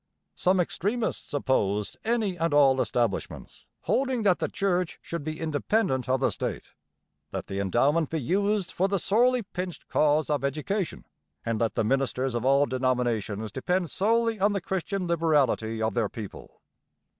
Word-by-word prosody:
Some 185 +1 +2
extremists 205 +6 -1
opposed 105 -8 0
any 220 -4 0
and 165 -3 0
all 135 -2 +5
establishments, 115 -6 -2
holding 260 -3 0
that 190 -3 +3
the - - 0
church 180 -3 -1
should 170 -3 -5
be 155 +1 -5
independent 155 - 0
of 130 0 +2
the - - +2
state. - - -4 0.6
Let - - -4
the 95 - -4
endowment 135 - +2
be 160 - -1
used 200 - 0
for 190 - +1
the 195 0 0
sorely 240 +6 +2
pinched 180 -2 -6
cause 150 0 +2
of 145 -2 0
education, 155 +7 -2 0.4
and 115 -1 -1
let 115 -3 0
the - - +1
ministers 130 +1 0
of 120 -1 -2
all 140 +2 +4
denominations 120 -5 -1
depend 175 - -1
solely 225 +2 +1
on 205 +2 +3
the 200 - -1
Christian 190 +1 -2
liberality 145 -10 +1
of 110 - 0
their 115 -4 0
people. 105 -4 -9
155 Hz, 155 wpm, -27 LUFS, 125-195 Hz, 0.6 s, all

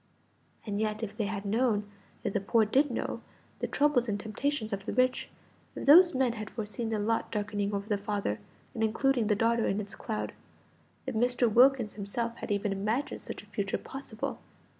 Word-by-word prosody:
And 205 -2 -2
yet, 215 +1 -1
if 210 - -4
they 215 - -1
had 205 -1 -4
known 215 -1 +1 0.4
if - - -1
the - - +2
poor 220 +3 +3
did 275 +7 +3
know 240 - -3 0.4
the - - -1
troubles 285 -5 +2
and 205 -1 -1
temptations 220 +1 -2
of 195 0 -5
the - - -1
rich; 255 0 +2 0.5
if - - -5
those 345 +4 +8
men 255 -2 +2
had 215 -2 -6
foreseen 225 +1 -4
the 220 - 0
lot 220 +2 0
darkening 205 -1 -1
over 200 0 -3
the 205 -2 0
father, 200 - -2 0.3
and 225 - -1
including 235 +1 +2
the 210 - +3
daughter 230 +2 +2
in 195 - 0
its 200 -1 -6
cloud; 215 +2 -4 0.7
if 260 - -3
Mr. 245 +2 +2
Wilkins 245 0 +5
himself 230 +3 -3
had - - -6
even 205 0 0
imagined 215 +8 -1
such - - -7
a - - -16
future 200 -1 -2
possible 265 -5 -6
220 Hz, 190 wpm, -30 LUFS, 205-245 Hz, 0.7 s, those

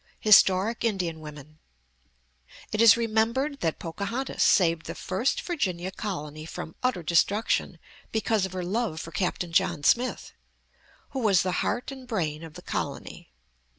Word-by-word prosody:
HISTORIC 210 +1 +5
INDIAN 180 -8 -1
WOMEN 150 0 -11 1.1
It 215 - +1
is 230 -1 +8
remembered 235 +5 0
that 165 -2 -1
Pocahontas 200 +10 -4
saved 165 -4 +3
the - - -5
first 190 +8 -1
Virginia 190 - -2
colony 155 -7 -5
from 160 - -7
utter 250 -9 0
destruction 200 +7 +1 0.3
because 220 -2 +1
of 185 - -13
her 185 -1 -3
love 195 -4 -1
for 165 - -7
Captain 180 -2 -2
John 165 -2 +1
Smith, 245 - +1 0.8
who 270 - -3
was 205 -7 +3
the 185 - -1
heart 245 +5 -2
and 265 -2 -10
brain 160 -10 -2
of 160 -2 -10
the - - -10
colony. - - -5
190 Hz, 145 wpm, -27 LUFS, 165-230 Hz, 1.1 s, is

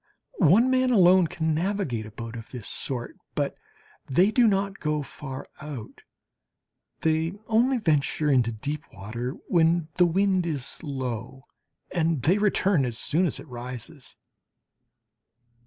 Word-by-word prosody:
One 210 - +5
man 255 0 +3
alone 185 -5 +6
can 160 0 -1
navigate 160 - -1
a - - -11
boat 115 +2 -7
of 115 -1 -8
this 120 -6 -8
sort, 125 -3 -4 0.2
but - - -1 0.5
they 180 +10 +4
do 240 0 +5
not 195 -1 0
go 150 -1 -1
far 135 -1 -7 0.2
out. 140 -7 -8 1.0
They 160 +2 +1
only 240 +5 +3
venture 155 - +1
into 120 -4 +3
deep 145 +7 -4
water 115 +7 -5
when 165 -1 +3
the 180 -1 +6
wind 185 0 +2
is 140 -5 -2
low 130 -2 -5 0.5
and 165 -5 +1
they 180 +8 +3
return 195 -6 +3
as 120 -3 -2
soon 175 +9 +1
as 150 - -2
it - - -11
rises. 125 +1 -6
155 Hz, 140 wpm, -26 LUFS, 125-185 Hz, 1.0 s, alone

